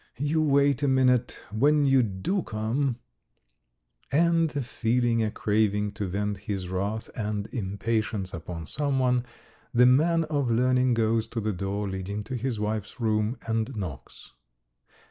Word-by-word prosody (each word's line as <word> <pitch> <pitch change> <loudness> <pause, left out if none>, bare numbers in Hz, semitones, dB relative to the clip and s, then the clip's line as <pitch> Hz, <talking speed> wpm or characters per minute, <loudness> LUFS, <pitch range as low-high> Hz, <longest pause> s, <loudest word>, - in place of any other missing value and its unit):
You 145 +4 +1
wait 140 -2 +3
a 145 - +2
minute, 130 -2 +2
when 145 +7 +3
you 135 -1 +5
do 110 - -1
come... 120 +3 -1 0.6
." - - -42
And 165 +1 +3
feeling 115 0 +1
a 110 - +1
craving 105 -1 +1
to 100 -1 -4
vent 100 +2 -2
his 95 -3 -4
wrath 100 +4 -3
and 105 -2 -2
impatience 105 -1 -2
upon 85 -1 -6
someone, 130 - +1 0.5
the 125 +1 +7
man 160 +6 +4
of 145 -5 -1
learning 125 +1 +3
goes 115 0 +1
to 115 - -4
the 110 -1 -1
door 100 +2 -3
leading 95 +2 -4
to 120 +5 -5
his 125 -2 -2
wife's 105 +1 -3
room 110 +1 0
and 115 +2 -1
knocks. 80 - -7
115 Hz, 145 wpm, -27 LUFS, 105-130 Hz, 0.6 s, the